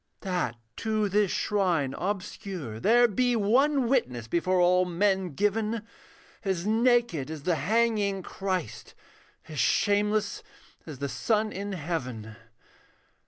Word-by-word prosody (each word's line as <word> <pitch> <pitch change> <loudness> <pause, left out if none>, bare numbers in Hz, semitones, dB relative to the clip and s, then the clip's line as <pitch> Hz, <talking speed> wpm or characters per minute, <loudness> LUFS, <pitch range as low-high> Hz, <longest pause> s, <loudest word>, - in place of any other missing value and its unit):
That 180 - -2 0.2
to 215 -2 0
this 205 0 +2
shrine 175 -12 0
obscure 185 - -4
there 240 - +5
be 245 +3 +1
One 255 +5 +3
witness 125 - 0
before 180 +5 +1
all 180 +1 +4
men 185 -2 0
given, 210 +3 0 0.6
As 190 -3 -1
naked 225 - +2
as 155 -3 -7
the 180 - +1
hanging 200 +3 +1
Christ, 190 -1 -4 0.5
As - - -6
shameless 205 0 +1 0.5
as 150 -4 -7
the 140 +2 -3
sun 215 - 0
in 200 0 -5
heaven. 130 - -4
195 Hz, 120 wpm, -27 LUFS, 170-215 Hz, 0.6 s, there